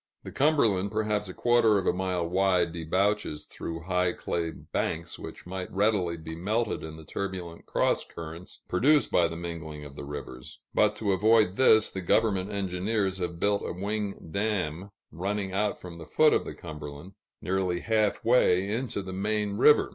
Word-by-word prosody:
The - - -8
Cumberland, 115 -10 +2
perhaps 105 -1 -1
a - - -6
quarter 120 -3 +4
of 95 - -1
a - - +3
mile 90 -2 -1
wide, 90 -2 +2
debouches 85 -1 0
through 80 0 -6
high 90 +1 +1
clay 85 -1 -2
banks, 85 +1 -3
which - - -9
might 95 0 -5
readily 95 -4 +1
be 80 0 -7
melted 105 +6 -1
in 80 0 -7
the 80 - -12
turbulent 90 -2 -5
cross - - +1
currents 85 +2 -9
produced 145 +10 +3
by 85 - +4
the 80 - -6
mingling 80 -3 -6
of 70 -1 -11
the - - -7
rivers; 70 -3 -8 0.2
but - - +3
to 105 -3 0
avoid 105 0 +4
this, 110 -3 +5
the 95 - -4
government 100 +1 +2
engineers 95 0 -1
have 85 -2 -3
built 100 +1 +2
a - - -3
wing 100 -1 -4
dam 100 -3 -1 0.2
running 95 +4 -2
out 105 +1 0
from 85 -2 -9
the 80 - -9
foot 155 -1 +4
of - - +1
the - - -6
Cumberland, 75 0 -8 0.3
nearly 95 -1 -1
half 110 -2 +1
way 100 -6 +4
into 115 -3 -2
the 95 0 -6
main 105 +1 -1
river. 150 +7 +5
95 Hz, 175 wpm, -28 LUFS, 85-105 Hz, 0.3 s, this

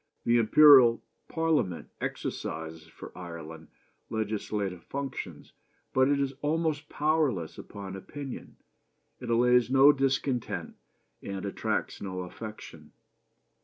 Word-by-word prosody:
The 120 0 +4
Imperial 125 0 +7 0.2
Parliament 160 - 0
exercises 80 0 -5
for 80 - -12
Ireland 80 -3 -9 0.4
legislative 105 -4 -3
functions, 130 - -6 0.4
but 130 0 +4
it 145 -1 +2
is 135 -1 -1
almost 155 0 -1
powerless 150 - 0
upon 100 -2 -8
opinion 135 +7 -8 0.6
it 125 - -7
allays 125 0 +4
no 135 +2 +7
discontent, 135 -3 -1 0.5
and 100 0 -5
attracts 100 - -2
no 95 -2 -4
affection. 105 +4 -9
115 Hz, 100 wpm, -28 LUFS, 95-140 Hz, 0.6 s, Imperial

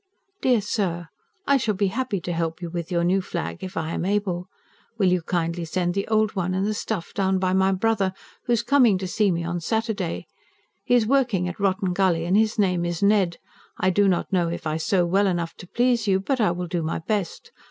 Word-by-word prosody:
DEAR 250 -4 +3
SIR, 180 -5 -2 0.4
I 280 - +4
shall 220 -5 0
be 195 0 +1
happy 235 -1 -2
to 175 - -3
help 165 0 -2
you 170 -2 -6
with 170 -1 -5
your 170 -1 +1
new 185 +3 +2
flag 85 - -5
if 185 +2 -6
I 160 0 -2
am - - -2
able. 190 -2 -1 0.5
Will 190 -4 +3
you 180 -1 +2
kindly 170 0 -2
send 175 +1 -1
the 195 +1 -2
old 215 -1 +1
one 185 -1 -1
and 190 +1 0
the 215 - 0
stuff 210 -4 -4
down 190 -1 +1
by 185 0 0
my 190 0 +3
brother, 195 0 +1 0.3
who 240 - +1
is 235 -1 +1
coming 240 -6 +4
to 190 - -4
see 205 +2 +1
me 170 -2 -1
on 170 +1 -2
Saturday. 220 -3 -2 0.6
He 245 - +2
is 235 -3 +4
working 235 -8 +2
at 180 - -6
Rotten 190 -2 +1
Gully, 175 -3 +1
and 180 +3 +1
his 220 +1 +2
name 180 -4 +2
is 175 +1 -2
Ned. 200 -4 +3 0.4
I 185 - +2
do 200 +2 +3
not 185 0 0
know 175 -2 +2
if 170 - -5
I 155 0 -1
sew 175 +2 +1
well 195 +4 +2
enough 170 -3 -1
to 180 - -11
please 240 +1 +1
you, 190 -1 +3
but 255 +6 -1
I 210 - +4
will 175 +1 -3
do 175 0 -2
my 160 0 -2
best. 205 - -3
190 Hz, 230 wpm, -24 LUFS, 175-210 Hz, 0.6 s, I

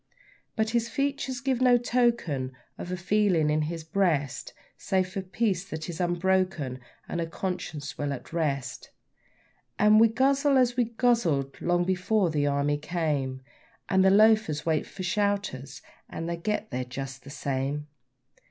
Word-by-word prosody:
But 220 0 0
his 235 0 0
features 275 -2 -2
give 260 -1 0
no 250 -1 +6
token 235 - 0 0.2
of 175 - -7
a 180 - -2
feeling 180 -4 +2
in 155 +1 +2
his 160 +1 -3
breast, 160 -6 0 0.2
Save 185 -1 -1
of 190 -1 -5
peace 195 -4 0
that 160 -1 -5
is 170 0 -4
unbroken 175 -6 0 0.3
and 170 - -2
a 165 - -2
conscience 170 -4 -5
well 145 -1 -1
at 140 +3 -7
rest; 140 -7 -2 0.9
And 210 +1 +6
we 230 - +7
guzzle 275 +4 +2
as 245 -2 +3
we 245 -2 +2
guzzled 220 - 0
long 175 0 +2
before 185 +1 +1
the 145 -2 +1
Army 145 +1 +1
came, 150 -5 -2 0.5
And 190 -1 +4
the 190 - +6
loafers 210 -7 +4
wait 160 -2 0
for 185 - -8
'shouters' 200 -8 -2 0.3
and 165 - -5
they 170 - -1
get 210 +4 -2
there 125 - -2
just 135 +1 -7
the 140 - -11
same. 140 0 -2
175 Hz, 155 wpm, -27 LUFS, 145-215 Hz, 0.9 s, we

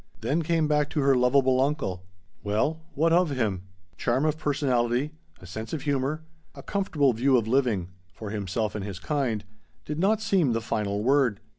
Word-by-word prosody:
Then 140 +9 0
came 165 -1 +1
back 150 -1 +1
to 150 - -1
her 140 0 +4
lovable 130 +1 +3
uncle. 135 -11 -1 0.4
Well, 110 +11 0
what 165 +3 +3
of 175 -1 +4
him? 105 -9 -1 0.3
Charm 130 +4 +1
of 155 -1 +1
personality, 135 -3 0 0.3
a 90 - -13
sense 110 +5 -7
of 155 - -3
humor, 145 +2 -1 0.3
a - - -10
comfortable 155 -9 +1
view 130 +3 +3
of 115 -2 -1
living 115 -8 +1 0.2
(for 105 +1 -8
himself 105 +1 -2
and 105 - -4
his 100 -2 -6
kind) 120 -2 -1 0.4
did 150 +1 -4
not 205 +4 +3
seem 195 - +2
the 115 - 0
final 105 -2 -2
word. 130 -5 +3
130 Hz, 175 wpm, -26 LUFS, 110-150 Hz, 0.4 s, her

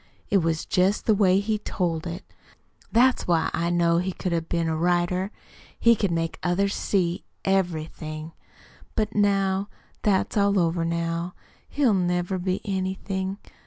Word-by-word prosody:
It 200 - +5
was 165 -2 -1
just 190 +3 +1
the 220 - +4
way 195 -2 +4
he 210 +1 -1
told 175 -5 -2
it. 170 +3 -6 0.7
That's 250 +3 +3
why 170 -2 +2
I 170 +1 0
know 170 -1 +3
he 185 +2 -1
could 185 - -3
have 165 -1 -1
been 170 -1 0
a 160 - 0
writer. 175 +3 +1 0.5
He 235 0 +6
could 200 -2 0
make 165 -1 -2
others 195 +3 +1
see 180 -3 0 0.2
everything. 160 -4 -2 0.6
But 215 -1 0
now 195 -1 +2 0.3
that's 195 -3 +1
all 200 -1 +3
over 170 -1 +1
now. 170 +1 -2 0.3
He'll 275 -6 +2
never 180 0 0
be 185 +1 -1
anything. 190 0 -2
180 Hz, 150 wpm, -25 LUFS, 170-200 Hz, 0.7 s, He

